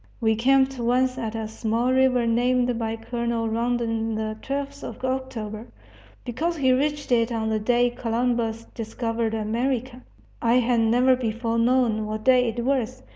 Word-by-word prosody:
We 220 -2 +2
camped 265 +3 +2
once 255 +2 +1
at 225 -2 -4
a 220 -1 -3
small 230 +3 -1
river 260 -2 +3
named 245 +1 +1
by 225 -1 -2
Colonel 235 0 -2
Rondon 225 -1 -1
the 215 0 -3
"Twelfth 280 +1 -4
of - - -6
October," 245 -4 -4 0.6
because 320 +8 -2
he 260 -3 +3
reached 290 +2 0
it 230 0 +3
on 220 -1 -1
the 220 0 0
day 245 +2 +2
Columbus 230 -1 -1
discovered 225 0 -2
America 240 +3 -2 0.4
I 235 0 +3
had 245 -1 +3
never 245 +3 +4
before 230 -1 -2
known 230 -3 +2
what 215 0 -4
day 250 -1 +4
it 235 +1 -4
was! 255 -1 -1
235 Hz, 155 wpm, -24 LUFS, 225-255 Hz, 0.6 s, never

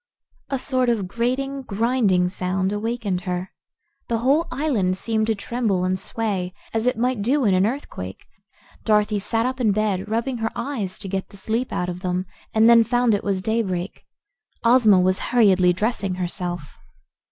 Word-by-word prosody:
A 275 - 0
sort 255 -1 +1
of 215 -6 0
grating, 255 +6 -1
grinding 215 -5 +1
sound 185 +1 -1
awakened 210 -3 -2
her. 180 0 -3 0.6
The 230 - 0
whole 275 +8 +2
island 245 -10 0
seemed 220 +2 -1
to 225 - +1
tremble 205 -3 -1
and 185 0 0
sway, 195 -4 -3 0.2
as 225 +2 0
it 250 - +1
might 250 -1 0
do 260 +5 +2
in 200 - +4
an 185 +2 +3
earthquake. 155 - -6 0.6
Dorothy 210 -1 +2
sat 225 +3 0
up 260 0 -2
in 220 -4 +3
bed, 210 -2 -1
rubbing 235 +3 -1
her 225 -1 -1
eyes 235 -7 -3
to 205 - -5
get 190 0 -3
the 200 - -13
sleep 225 +6 -2
out 180 - -1
of 180 0 -4
them, 180 0 -2 0.3
and 220 +1 +4
then 235 -1 +7
found 245 0 +2
it 205 - 0
was 195 -2 -1
daybreak. 195 -4 -2 0.6
Ozma 230 -5 +6
was 185 +1 +2
hurriedly 195 -7 +5
dressing 200 0 -1
herself. 175 -3 -4
215 Hz, 170 wpm, -23 LUFS, 185-240 Hz, 0.6 s, then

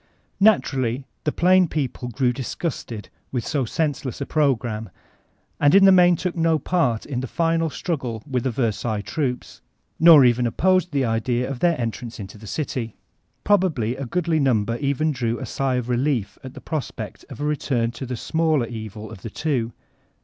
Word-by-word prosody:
Naturally, 135 - +2 0.2
the 150 - +2
plain 185 +2 +4
people 135 -5 -3
grew 125 +1 0
disgusted 125 -4 -5 0.2
with 125 -3 -2
so 140 -5 0
senseless 145 -1 -2
a 140 - -3
program, 120 -8 0 0.7
and 145 +4 +5
in 195 0 +7
the 195 - +8
main 180 -1 +6
took 180 +1 -3
no 165 -1 +2
part 150 -10 0
in 135 -4 -3
the 130 - -4
final 165 +3 +1
struggle 130 -9 -4
with 130 -4 -1
the 130 - 0
Versailles 110 -3 -1
troops, 125 +1 -4 0.4
nor 160 -5 +9
even 120 0 +3
op 115 - -6
posed 185 -2 +3
the 140 -3 +1
idea 120 +2 0
of 135 -2 -5
their 170 -1 +2
entrance 115 0 -4
into 100 +1 -9
the 110 - -11
city. 125 -4 -3 0.5
Probably 165 - +2
a 135 -1 -5
goodly 165 +2 0
nimiber 115 -4 +1
even 145 +2 0
drew 120 -4 -1
a 130 - -5
sigh 130 +2 -1
of 125 -2 -2
relief 125 -5 -1
at 130 -1 -9
the - - -9
pros 155 -4 -3
pect - - -8
of - - -9
a 145 - -2
return 130 -6 0
to 125 +2 -7
the 125 - -3
smaUer 155 0 0
evil 110 -2 -7
of 100 -5 -10
the 115 - -6
two. 125 -2 -1
130 Hz, 185 wpm, -23 LUFS, 115-160 Hz, 0.7 s, nor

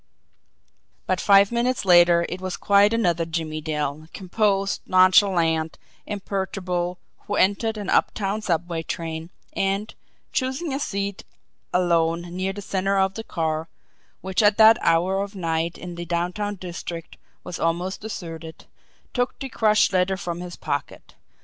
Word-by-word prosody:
But 185 -1 0
five 200 0 +5
minutes 240 -1 0
later 175 -1 +6
it 185 - -6
was 185 -1 -4
quite 200 +1 +4
another 175 -8 +1
Jimmie 160 -1 -3
Dale, 150 0 -3
composed, 195 +1 0
nonchalant, 180 -4 +4 0.3
imperturbable, 190 -3 -3 0.3
who 205 - -1
entered 215 +4 +2
an 205 -2 -5
up - - +3
town 205 +1 -2
subway 170 -3 -1
train, 160 0 -5 0.2
and, 195 +2 -1 0.4
choosing 265 +4 -1
a 270 - -1
seat 200 -6 -3 0.5
alone 170 -1 +1
near 190 +1 -1
the 205 +1 -8
centre 195 +1 0
of 190 0 +2
the 225 - -6
car, 160 -5 -2 0.5
which 190 +1 0
at 205 -1 +4
that 225 +1 +7
hour 180 +4 +2
of 200 +1 -5
night 165 -2 -2
in 180 -1 -7
the 175 0 -6
downtown 180 +5 -2
district 170 -2 -7 0.3
was 175 - -6
almost 175 +3 -1
deserted, 165 -6 -7 0.5
took 245 0 -1
the 270 - -6
crushed 215 -4 +3
letter 185 +1 +2
from 175 -2 -4
his 180 -1 -7
pocket. - - -5
185 Hz, 145 wpm, -24 LUFS, 170-200 Hz, 0.5 s, that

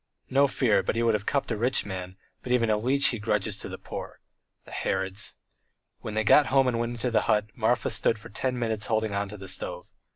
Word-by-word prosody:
No 140 +1 +5
fear, 115 -7 +2
but - - -2
he 115 - +1
would 115 -1 +3
have 105 -1 -2
cupped 140 -3 0
a - - +1
rich 125 +4 +2
man, 95 -1 -6 0.2
but 125 - -6
even 115 -3 +3
a 105 - +3
leech 135 +5 +4
he 120 - -3
grudges 105 -1 -1
to - - -6
the - - -6
poor. - - -8 0.5
The - - -14
Herods!" 95 +1 -1 0.6
When 110 - -6
they 110 - +1
got 145 +7 +6
home 135 -1 +3
and 120 -2 0
went 120 0 -2
into 120 +1 -2
the 110 -2 +3
hut, 105 0 +2
Marfa 115 0 +1
stood 115 - +1
for 105 - -11
ten 125 +4 -2
minutes 110 -3 -1
holding 110 -2 0
on 100 0 -2
to 105 - -8
the 95 -1 -9
stove. 95 - -4
110 Hz, 235 wpm, -27 LUFS, 105-125 Hz, 0.6 s, got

